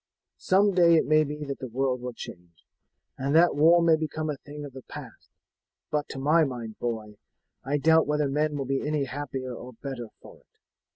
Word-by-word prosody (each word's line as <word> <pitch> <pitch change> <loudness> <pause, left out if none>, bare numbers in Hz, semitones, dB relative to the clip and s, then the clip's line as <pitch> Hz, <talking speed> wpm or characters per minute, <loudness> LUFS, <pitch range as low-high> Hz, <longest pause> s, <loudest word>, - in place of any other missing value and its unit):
Some 195 +2 +3
day 170 -2 +6
it 160 - +3
may 155 0 +4
be 150 +1 -5
that 140 -1 -5
the 130 - -5
world 125 +1 -1
will 125 0 -5
change, 85 -6 -11 0.5
and 140 +3 0
that 170 0 +5
war 165 +4 +5
may 165 -1 +5
become 155 0 -3
a 145 - -5
thing 145 +1 -9
of 140 - -10
the 130 - -9
past; - - -11 0.6
but 150 -1 -1
to - - -7
my 155 +5 +4
mind, 120 -6 -5
boy, 110 -3 -4 0.5
I 140 +3 0
doubt 160 +2 +4
whether 150 -1 +1
men 150 +2 0
will 135 - -3
be 135 +1 -1
any 150 -1 -1
happier 135 -1 -5
or 125 +1 -9
better 120 0 -6
for - - -14
it. - - -32
145 Hz, 205 wpm, -27 LUFS, 130-155 Hz, 0.6 s, day